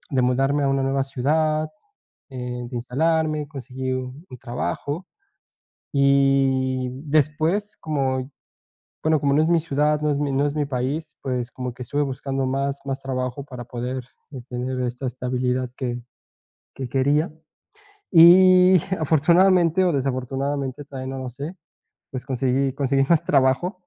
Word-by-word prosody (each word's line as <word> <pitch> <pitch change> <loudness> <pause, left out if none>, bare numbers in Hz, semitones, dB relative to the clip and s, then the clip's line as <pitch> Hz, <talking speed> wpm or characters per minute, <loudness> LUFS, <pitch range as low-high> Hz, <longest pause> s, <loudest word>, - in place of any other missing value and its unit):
de 130 - +3
mudarme 135 +3 +2
a 140 - +2
una 135 0 +1
nueva 135 0 +1
ciudad, 155 +4 0 0.6
eh, 125 -2 -5
de 125 - -6
instalarme, 155 +4 0
conseguí 130 -2 -5
u 130 +4 -6
un 125 - -10
trabajo, 140 +7 -4 0.9
y 135 -2 +2 0.2
después 155 +8 +1
como, 135 -3 -2 0.7
bueno, 155 -1 +3
como 140 0 +1
no 150 - +4
es 160 - +1
mi 170 -1 +4
ciudad, 150 -1 +1
no 150 - +1
es 145 - 0
mi 145 -1 -1
no 140 +2 +2
es 145 - -2
mi 150 -1 0
país, 140 +4 -3
pues, 125 -2 -3
como 125 -1 -5
que 125 - -8
estuve 145 +5 -1
buscando 135 -1 -2
más 135 +1 -1
más 135 0 -3
trabajo 130 0 -3
para 125 -4 -8
poder 125 +2 -4 0.5
tener 125 +1 -3
esta 125 +1 -3
estabilidad 125 0 -1
que 120 -2 -3 0.7
que 135 -2 -5
quería, 145 +5 +1 0.8
y 180 +1 +8 0.2
afortunadamente, 170 +3 +4
o 180 - +3
desafortunadamente, 135 0 -2
todavía 135 -1 -6
no 135 - -5
lo 125 - -4
sé, 145 +8 -7 0.6
pues, 130 -1 -5
conseguí 130 +1 0
conseguí 135 0 +1
más 170 -3 +4
trabajo 135 +7 +2
135 Hz, 145 wpm, -23 LUFS, 130-150 Hz, 0.9 s, y